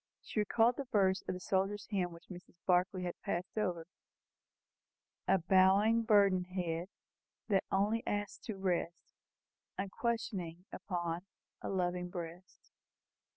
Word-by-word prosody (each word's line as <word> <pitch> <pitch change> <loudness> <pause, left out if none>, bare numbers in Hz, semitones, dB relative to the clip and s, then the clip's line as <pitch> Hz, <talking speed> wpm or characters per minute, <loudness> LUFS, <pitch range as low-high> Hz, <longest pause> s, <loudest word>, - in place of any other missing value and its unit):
She - - -3
recalled 225 +3 +3
the 280 - -3
verse 195 -5 +2
of - - -1
the - - -6
soldier's 195 +2 0
hymn 185 -3 0
which 170 0 -14
Mrs. 180 -1 -11
Barclay 180 0 +2
had 175 -1 -5
passed 175 +2 -3
over 180 -6 -1 1.4
"A - - +5
bowing, 190 +5 +5
burdened 200 -4 +4
head, 175 -2 -2 0.6
That 195 -2 +3
only 210 +4 +2
asks 205 -1 -2
to 215 -4 -3
rest, 175 -3 -2 0.6
Unquestioning, 195 -4 -2
upon 175 0 -3 0.3
A - - -4
loving 180 -1 -1
breast." 175 +1 -8
190 Hz, 125 wpm, -34 LUFS, 175-205 Hz, 1.4 s, A